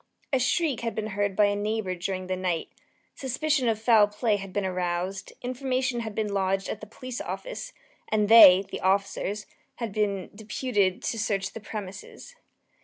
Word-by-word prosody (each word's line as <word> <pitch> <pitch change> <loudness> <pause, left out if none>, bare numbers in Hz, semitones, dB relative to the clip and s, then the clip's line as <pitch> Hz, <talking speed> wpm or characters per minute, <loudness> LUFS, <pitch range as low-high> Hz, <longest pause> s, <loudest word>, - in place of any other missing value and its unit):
A 265 - +4
shriek 275 +1 +1
had 230 -1 -3
been 215 0 -3
heard 200 -1 0
by 210 +1 +5
a 205 0 +1
neighbour 210 -2 -1
during 185 +1 -3
the 185 0 -2
night; 180 -3 -2 0.4
suspicion 270 0 0
of 220 -1 0
foul 220 -2 +5
play 210 +1 0
had 195 -1 -8
been 200 0 -1
aroused; 185 +1 -2
information 255 0 -1
had 220 -3 -5
been 210 -2 -1
lodged 195 0 0
at 220 - -5
the 210 - -8
police 250 +3 -7
office, - - -6 0.4
and 210 -1 +2
they 195 -4 +9
(the - - -4
officers) 200 +2 0 0.3
had 230 -4 -5
been 200 -3 -1
deputed 205 -2 -1
to 225 - -2
search 200 -3 -1
the - - -6
premises. 205 - -8
210 Hz, 175 wpm, -27 LUFS, 195-230 Hz, 0.4 s, they